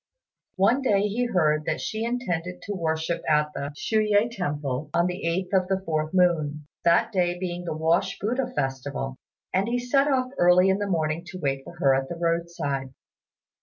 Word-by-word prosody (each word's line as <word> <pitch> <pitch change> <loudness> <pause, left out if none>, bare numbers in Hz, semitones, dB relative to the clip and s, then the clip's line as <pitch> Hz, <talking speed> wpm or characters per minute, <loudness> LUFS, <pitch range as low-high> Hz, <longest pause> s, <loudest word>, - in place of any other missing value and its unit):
One 225 +8 +3
day 205 -7 +3
he 210 +4 0
heard 155 -8 +2
that 160 - -1
she 220 +1 -3
intended 185 -8 -3
to 205 - -4
worship 165 -1 -1
at 150 0 +2
the 140 +1 -4
Shui 215 +3 +1
yüeh 220 +4 +3
temple 145 -5 -3
on 170 0 +3
the 180 +2 -3 0.3
8th 190 - +5
of 185 - -11
the 190 0 0
fourth 155 -2 -1
moon, 155 -5 +2 0.2
that 170 +7 +4
day 180 -3 +1
being 175 -1 -4
the 155 -2 -3
Wash 160 +2 +1
Buddha 250 +5 -1
festival; 135 - -3 0.4
and 190 +3 +2
he 240 +1 0
set 275 +3 +2
off 255 -2 +1
early 180 +2 +6
in 190 +1 +2
the 205 - -1
morning 160 -2 0
to 185 - -7
wait 135 -3 -1
for 170 - -11
her 140 -6 +4
at 135 0 0
the 170 - -4
roadside. 165 -6 -2
175 Hz, 190 wpm, -25 LUFS, 155-205 Hz, 0.4 s, early